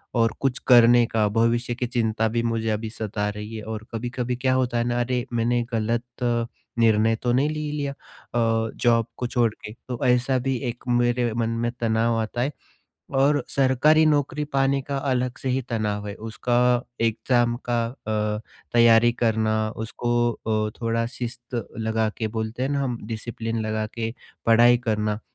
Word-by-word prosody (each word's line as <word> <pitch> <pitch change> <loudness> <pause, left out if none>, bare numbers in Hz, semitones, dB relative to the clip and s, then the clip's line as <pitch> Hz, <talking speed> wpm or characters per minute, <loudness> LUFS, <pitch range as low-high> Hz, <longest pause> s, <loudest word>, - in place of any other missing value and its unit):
और 115 -1 +3
कुछ 135 -2 0
करने 120 -1 +7
का 110 -2 +1
भविष्य 120 +1 +2
की 125 - -2
चिंता 115 -2 0
भी 115 +1 0
मुझे 115 -1 -1
अभी 110 +1 -2
सता 105 -2 -3
रही 105 +2 -7
है 110 - -6
और 110 0 -6
कभी-कभी 125 +1 -2
क्या 130 +1 +1
होता 125 -2 +1
है 120 - +2
ना 120 0 -1
अरे, 125 0 -1
मैंने 120 +1 +1
गलत 115 +1 0 0.8
निर्णय 110 0 +4
तो 120 - +2
नहीं 140 +4 +2
ले 155 - -3
लिया 145 -2 -2
अ, 115 -4 -2
जॉब 115 -1 +3
को 125 - -2
छोड़ 120 -3 +1
के, 105 - -10 0.2
तो 125 -2 -4
ऐसा 125 +1 +3
भी 135 +1 -1
एक 120 0 -8
मेरे 120 -1 +2
मन 115 0 0
में 115 +1 -1
तनाव 115 0 +2
आता 110 +2 -3
है 135 +4 0 0.7
और 145 0 +3
सरकारी 140 +4 +4
नौकरी 150 0 +1
पाने 135 0 +2
का 140 - -1
अलग 130 -2 -1
से 130 - -2
ही 130 +1 +1
तनाव 105 -3 -2
है, 100 - -4
उसका 120 +2 +1 0.2
एग्ज़ाम 120 +1 +2
का 120 -1 +1
अ, 105 -3 -2 0.3
तैयारी 115 0 +6
करना 110 -1 +2 0.3
उसको 120 +1 -2 0.2
अ, 110 -1 -1
थोड़ा 115 0 0
शिष्ट 120 -1 -5
लगा 110 0 0
के 110 - -1
बोलते 110 +3 -3
हैं 135 - -1
ना 140 -1 0
हम 125 -3 -2
डिसिप्लिन 115 0 -4
लगा 110 0 -1
के 115 -1 -3 0.3
पढ़ाई 120 +1 +6
करना, 105 -3 -1
120 Hz, 175 wpm, -24 LUFS, 110-125 Hz, 0.8 s, करने